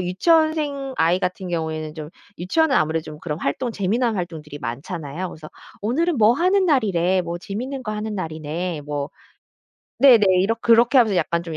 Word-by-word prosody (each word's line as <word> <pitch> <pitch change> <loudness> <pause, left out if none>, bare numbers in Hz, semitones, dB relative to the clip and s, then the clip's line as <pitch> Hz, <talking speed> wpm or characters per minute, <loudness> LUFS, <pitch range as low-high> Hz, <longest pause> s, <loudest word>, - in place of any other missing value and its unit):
유치원생 285 - +1
아이 170 +3 +2
같은 185 0 -3
경우에는 160 -2 -3
좀 155 -2 -7 0.3
유치원은 275 - +1
아무래도 160 +1 +1
좀 150 -1 -9
그런 155 -2 -4
활동 235 - -2
재미난 225 +3 0
활동들이 160 -5 -6
많잖아요. 150 +7 -5
그래서 155 -2 -11 0.3
"오늘은 295 +9 0
뭐 220 0 +5
하는 370 +8 +2
날이래. 190 - +2
뭐 170 -1 -4
재밌는 250 +9 -5
거 215 -3 -4
하는 215 0 -4
날이네." 160 -1 -4
뭐 145 -1 -3 0.9
네네 240 -6 +7
이렇 210 +5 +1
그렇게 235 +3 +4
하면서 215 -6 +3
약간 170 -1 0
185 Hz, 375 characters per minute, -22 LUFS, 160-245 Hz, 0.9 s, 네네